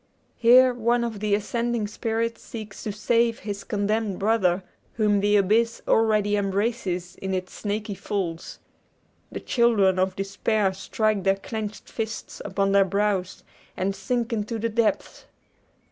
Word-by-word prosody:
Here 250 +2 +6
one 240 0 +1
of 225 -3 -4
the 210 -1 +2
ascending 235 +2 -1
spirits 225 +2 -2
seeks 215 -4 -8
to 215 - -1
save 230 +2 +1
his 205 -4 -5
condemned 210 -1 -1
brother, 195 -4 +2 0.3
whom 210 -3 +2
the 205 +1 +2
abyss 220 +4 +2
already 215 -2 +3
embraces 195 -3 -1
in 190 0 -3
its 185 0 -4
snaky 210 0 -3
folds. 185 -3 -4 0.7
The - - -5
children 210 -6 +3
of 185 0 +1
despair 195 0 0
strike 215 +1 -1
their 195 0 +3
clenched 215 +1 -6
fists 220 -1 -5
upon 195 -1 0
their 200 0 +6
brows, 195 -1 -1 0.3
and 195 +1 -1
sink 245 0 -2
into 225 +1 -2
the 230 +1 -1
depths! 225 0 -1
210 Hz, 140 wpm, -25 LUFS, 195-230 Hz, 0.7 s, Here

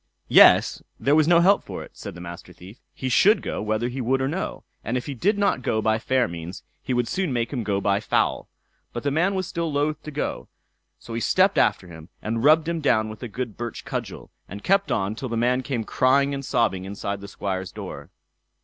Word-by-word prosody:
Yes, - - +6 0.2
there 140 - +2
was 155 0 +4
no 170 0 +6
help 195 +3 +4
for - - -7
it, - - -14
said - - -9
the 85 - -9
Master 85 +1 -9
Thief; 95 +7 -14
he 130 - -5
should 195 - +4
go - - -3
whether 110 +2 -1
he 125 +2 -4
would 130 +3 +1
or 130 - 0
no; 175 +7 -4 0.2
and 120 +2 -1
if 125 - -4
he 145 - -4
did 200 - +1
not 200 -10 +1
go 110 -3 0
by 110 +1 +1
fair 130 +1 +1
means, 85 +2 -8 0.2
he - - -5
would 125 -1 +1
soon 185 -4 -1
make 120 +1 -1
him 125 - -1
go 100 -1 0
by 100 0 +1
foul. 105 - 0 0.4
But 120 - -5
the 145 - 0
man 180 +7 +1
was 185 -1 -1
still 170 -1 -3
loath 145 +2 -1
to - - -8
go; 150 0 -4 0.5
so 115 - -10
he 115 - -2
stepped 190 - +3
after 90 - +2
him, 80 0 -12
and 115 +2 -3
rubbed 155 +2 +5
him 170 -1 -2
down 110 -6 +2
with 110 - -10
a 125 - -4
good 115 -1 -5
birch 120 -2 -6
cudgel, - - -6 0.2
and 100 +2 -8
kept 195 +1 +2
on 95 0 0
till 125 +3 -6
the 115 - -2
man 125 +2 +2
came 130 -3 -3
crying 140 +5 +2
and 140 0 -4
sobbing 95 -7 0
inside 100 +1 -5
the 100 - -8
Squire's 95 -2 -4
door. - - -8
125 Hz, 230 wpm, -24 LUFS, 105-150 Hz, 0.5 s, Yes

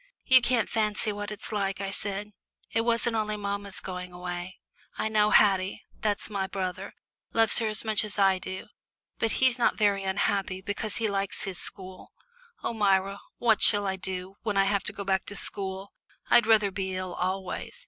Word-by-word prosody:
"You 260 -1 +7
can't 240 -1 +1
fancy 215 -1 0
what 205 0 -5
it's 210 +1 -6
like," 195 -2 -1
I 195 -1 -3
said. 205 +1 -3 0.4
"It 225 - +2
wasn't 230 0 +1
only 215 -1 -1
mamma's 200 -1 -3
going 180 -1 -6
away; 180 +1 -6 0.4
I 220 - -1
know 210 -1 +3
Haddie 195 -3 +3 0.2
that's 210 -2 -1
my 195 -3 -2
brother 185 -2 -4 0.4
loves 225 -2 +4
her 225 - 0
as 215 +1 0
much 215 -1 +5
as 210 -1 -3
I 195 -2 +4
do, 185 +1 -6 0.5
but 225 - +1
he's 255 -1 +3
not 240 - +2
very 200 -2 +2
unhappy, 190 0 0
because 205 +2 -4
he 225 - 0
likes 200 -1 -2
his 190 -2 -3
school. 185 -1 -2 0.5
Oh, - - -1
Myra, 195 -2 +2 0.2
what 225 -3 +3
shall 205 -2 +5
I 190 -1 0
do 190 +1 -5
when 210 -3 -1
I 195 - +5
have 200 -1 +1
to - - +2
go 200 -1 -6
back 190 -1 0
to 205 - -7
school? 195 0 -5 0.4
I'd 235 -2 +6
rather 215 -3 +4
be 190 -1 -3
ill 185 -1 -4
always. 190 - -3
200 Hz, 190 wpm, -28 LUFS, 190-215 Hz, 0.5 s, You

